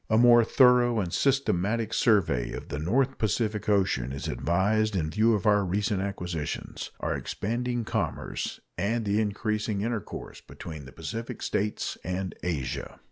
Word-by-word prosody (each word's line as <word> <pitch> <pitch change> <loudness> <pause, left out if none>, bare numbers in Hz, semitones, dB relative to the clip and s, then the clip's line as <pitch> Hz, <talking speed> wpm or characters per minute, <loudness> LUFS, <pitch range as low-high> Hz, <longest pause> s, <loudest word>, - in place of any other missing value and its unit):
A 110 - +4
more 120 0 +7
thorough 125 -1 +5
and 90 -4 -2
systematic 115 -5 +1
survey 90 - +2
of - - -7
the 75 - -3
North 130 - +1
Pacific 110 0 0
Ocean 95 -11 +2
is 70 - -5
advised 95 - +1
in 80 -4 -1
view 110 +3 +3
of 100 - -3
our 105 -1 +4
recent 100 +2 0
acquisitions, 90 -5 -4
our - - 0
expanding 120 +2 -2
commerce, 110 -8 -3 0.2
and 110 +4 0
the 105 +2 +2
increasing 105 0 -1
intercourse 115 -2 -4
between 80 -4 -9
the 65 - -11
Pacific 115 - -6
States 105 +1 -2
and 90 +1 -3
Asia. 70 -8 -3
105 Hz, 145 wpm, -28 LUFS, 90-115 Hz, 0.2 s, more